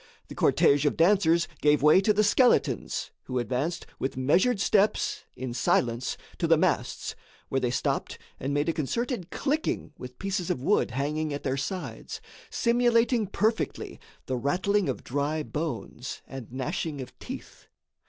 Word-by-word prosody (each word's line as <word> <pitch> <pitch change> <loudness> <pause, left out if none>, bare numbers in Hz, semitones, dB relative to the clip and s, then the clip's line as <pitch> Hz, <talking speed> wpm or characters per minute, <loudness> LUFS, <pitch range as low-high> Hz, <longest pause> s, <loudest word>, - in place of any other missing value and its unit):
The - - -8
cortège 140 0 +4
of 145 - +1
dancers 170 -1 +4
gave 150 -1 +4
way 150 +5 +7
to 210 - +3
the 210 +1 +3
skeletons, 245 +4 +2
who 130 - -3
advanced 130 - -1
with 135 0 -3
measured 180 - +3
steps, 205 +1 +2
in 130 -1 -5
silence, 120 0 +1 0.2
to - - +1
the - - +5
masts, - - 0 0.3
where 135 - +1
they 125 - +1
stopped 120 - -1 0.2
and 135 - -2
made 145 +2 0
a 165 - +2
concerted 185 - -2
clicking 290 - -2
with 125 0 -9
pieces 195 -3 -2
of - - 0
wood 205 +7 +2
hanging 145 +4 -2
at 145 - -7
their 130 - 0
sides, 180 +7 -5 0.3
simulating 235 -2 +2
perfectly 220 +3 -1 0.3
the 130 - -2
rattling 185 - +1
of 130 - -3
dry 145 +4 -1
bones 130 -5 -5
and 135 -4 -9
gnashing 135 +3 -3
of 130 - -8
teeth. - - -9
155 Hz, 155 wpm, -27 LUFS, 130-200 Hz, 0.3 s, way